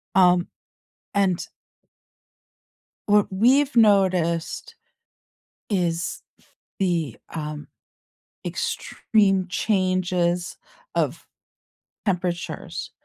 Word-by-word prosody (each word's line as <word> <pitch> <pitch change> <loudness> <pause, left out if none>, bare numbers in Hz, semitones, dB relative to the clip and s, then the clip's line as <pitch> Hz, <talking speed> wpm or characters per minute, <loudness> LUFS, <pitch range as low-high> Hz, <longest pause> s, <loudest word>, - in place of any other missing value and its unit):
um, 180 -1 +5 0.7
and 190 -3 +1 1.6
what 205 0 +5
we've 260 +8 +3
noticed 185 -7 +2 1.0
is 170 -3 -1 0.6
the 170 - 0 0.2
um 150 -1 -5 0.8
extreme 195 -4 +1
changes 185 -3 0 0.4
of - - -1 0.8
temperatures. 175 -2 -3
185 Hz, 55 wpm, -24 LUFS, 175-200 Hz, 1.6 s, um